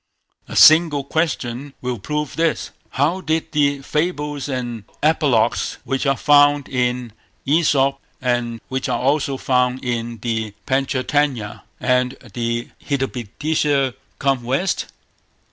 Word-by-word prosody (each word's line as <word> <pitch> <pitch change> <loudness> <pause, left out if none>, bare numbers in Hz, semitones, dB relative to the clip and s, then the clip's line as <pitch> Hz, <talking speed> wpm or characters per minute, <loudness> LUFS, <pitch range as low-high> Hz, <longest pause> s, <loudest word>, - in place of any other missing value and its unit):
A - - -8
single 155 -3 +7
question 140 -3 -2
will 125 -2 -3
prove 150 +5 -3
this. 165 -1 0 0.2
How 155 +8 0
did 160 -1 -1
the 140 -2 +1
fables 150 -2 -2
and 120 -4 -4 0.2
apologues 145 -7 +2
which 135 +1 -1
are 135 -1 +2
found 145 -1 +5
in 125 -2 -1 0.3
Æsop, 140 -2 +3 0.2
and 120 -2 -1
which 130 0 -3
are - - 0
also 140 +1 +1
found 125 0 +1
in 120 -1 -2
the 110 -3 -2
Pantcha 130 0 0
Tantya 135 -9 0 0.2
and 125 0 +1 0.2
the 115 +1 -2
Hitopadesa 140 +1 0 0.2
come 135 -2 +1
West? 135 +11 -1
135 Hz, 120 wpm, -20 LUFS, 125-150 Hz, 0.3 s, single